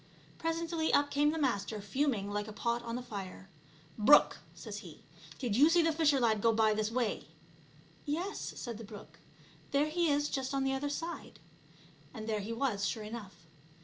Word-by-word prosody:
Presently 330 Hz, 0 st, -1 dB
up 285 Hz, 0 st, +3 dB
came 290 Hz, +1 st, +3 dB
the 320 Hz, -, -1 dB
Master, 220 Hz, -7 st, -1 dB
fuming 205 Hz, -1 st, -1 dB
like 205 Hz, +1 st, -2 dB
a -, -, -6 dB
pot 235 Hz, +2 st, -1 dB
on 230 Hz, -1 st, -5 dB
the 250 Hz, -, -4 dB
fire. 195 Hz, -4 st, -8 dB, 0.2 s
" 160 Hz, 0 st, -26 dB
Brook," 265 Hz, +8 st, +6 dB, 0.2 s
says -, -, -7 dB
he, -, -, -12 dB, 0.2 s
" -, -, -16 dB
did 240 Hz, -7 st, -1 dB
you 290 Hz, +7 st, +6 dB
see 340 Hz, 0 st, +4 dB
the 325 Hz, -, +3 dB
fisher 305 Hz, -3 st, +3 dB
lad 220 Hz, -4 st, +2 dB
go 230 Hz, -, +4 dB
by 220 Hz, -1 st, +3 dB
this 215 Hz, 0 st, 0 dB
way?" 235 Hz, -, -1 dB, 0.8 s
"Yes," 345 Hz, +8 st, -3 dB
said 235 Hz, -3 st, -6 dB
the -, -, -7 dB
brook; 200 Hz, -7 st, -12 dB, 0.5 s
"there 285 Hz, +2 st, +2 dB
he 340 Hz, +1 st, +1 dB
is 290 Hz, 0 st, +2 dB
just 270 Hz, -1 st, -2 dB
on 270 Hz, -, +1 dB
the 270 Hz, 0 st, +1 dB
other 275 Hz, +2 st, -2 dB
side." 330 Hz, +4 st, -5 dB, 0.8 s
And 220 Hz, -1 st, -6 dB
there 215 Hz, -1 st, 0 dB
he 205 Hz, +3 st, -5 dB
was 230 Hz, -4 st, -1 dB
sure 220 Hz, +1 st, -3 dB
enough. 205 Hz, -6 st, -9 dB
240 Hz, 195 wpm, -32 LUFS, 210-290 Hz, 0.8 s, Brook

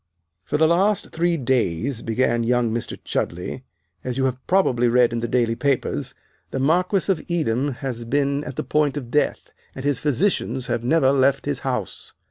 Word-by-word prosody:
"For 150 Hz, -, -1 dB
the 160 Hz, +1 st, +4 dB
last 190 Hz, +4 st, +2 dB
three 170 Hz, +1 st, +1 dB
days," 125 Hz, -, 0 dB
began 120 Hz, +1 st, +1 dB
young 120 Hz, -1 st, +1 dB
Mr. 115 Hz, +1 st, -3 dB
Chudleigh, 90 Hz, +9 st, -3 dB, 0.4 s
"as 125 Hz, 0 st, -3 dB
you 135 Hz, -, +1 dB
have 130 Hz, -1 st, -1 dB
probably 130 Hz, -11 st, +3 dB
read 120 Hz, 0 st, +4 dB
in 115 Hz, -, -1 dB
the 120 Hz, -, -2 dB
daily 120 Hz, -1 st, +1 dB
papers, 135 Hz, +2 st, -1 dB, 0.3 s
the -, -, -4 dB
Marquis 180 Hz, +7 st, +2 dB
of 185 Hz, -, -1 dB
Edam 145 Hz, -5 st, 0 dB
has 120 Hz, -3 st, -3 dB
been 140 Hz, +3 st, 0 dB
at 135 Hz, -, -6 dB
the -, -, -2 dB
point 150 Hz, -1 st, +1 dB
of 125 Hz, -4 st, -6 dB
death, 150 Hz, -, 0 dB, 0.2 s
and 130 Hz, -, -6 dB
his 145 Hz, -3 st, +1 dB
physicians 145 Hz, -, 0 dB
have 120 Hz, -1 st, -2 dB
never 135 Hz, +1 st, +3 dB
left 135 Hz, 0 st, +2 dB
his 140 Hz, -2 st, -2 dB
house. 125 Hz, -9 st, -4 dB
130 Hz, 180 wpm, -22 LUFS, 120-150 Hz, 0.4 s, the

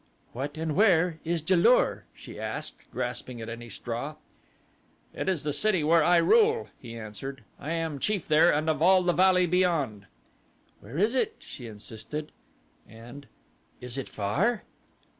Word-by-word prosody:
"What 140 Hz, +5 st, -5 dB
and 160 Hz, -2 st, -2 dB
where 180 Hz, -5 st, +3 dB
is 165 Hz, -1 st, -2 dB
Ja 185 Hz, -, +4 dB
lur?" -, -, +3 dB
she -, -, -11 dB
asked, -, -, -6 dB
grasping 125 Hz, -2 st, -4 dB
at 110 Hz, -, -6 dB
any 120 Hz, +1 st, -8 dB
straw. -, -, -5 dB, 1.0 s
"It -, -, -2 dB
is 180 Hz, -6 st, -1 dB
the 150 Hz, -1 st, -1 dB
city 190 Hz, +1 st, +2 dB
where 160 Hz, +1 st, +4 dB
I 175 Hz, +2 st, +5 dB
rule," 450 Hz, -, +4 dB
he 115 Hz, -2 st, -9 dB
answered. 115 Hz, +4 st, -7 dB, 0.2 s
"I 155 Hz, +3 st, -4 dB
am 165 Hz, -4 st, -2 dB
chief 205 Hz, +3 st, -1 dB
there 155 Hz, +3 st, +5 dB
and 155 Hz, +2 st, 0 dB
of 155 Hz, -2 st, 0 dB
all 185 Hz, +2 st, +5 dB
the 175 Hz, 0 st, +2 dB
valley 185 Hz, 0 st, +4 dB
beyond." 160 Hz, -, 0 dB, 0.7 s
"Where 115 Hz, +9 st, -9 dB
is 210 Hz, +6 st, +2 dB
it?" 260 Hz, -, 0 dB
she 120 Hz, -, -10 dB
insisted, 115 Hz, +7 st, -7 dB, 0.6 s
and 120 Hz, +5 st, -12 dB, 0.5 s
"is 125 Hz, -1 st, -5 dB
it 135 Hz, -6 st, -4 dB
far?" 180 Hz, -, 0 dB
155 Hz, 160 wpm, -27 LUFS, 125-180 Hz, 1.0 s, I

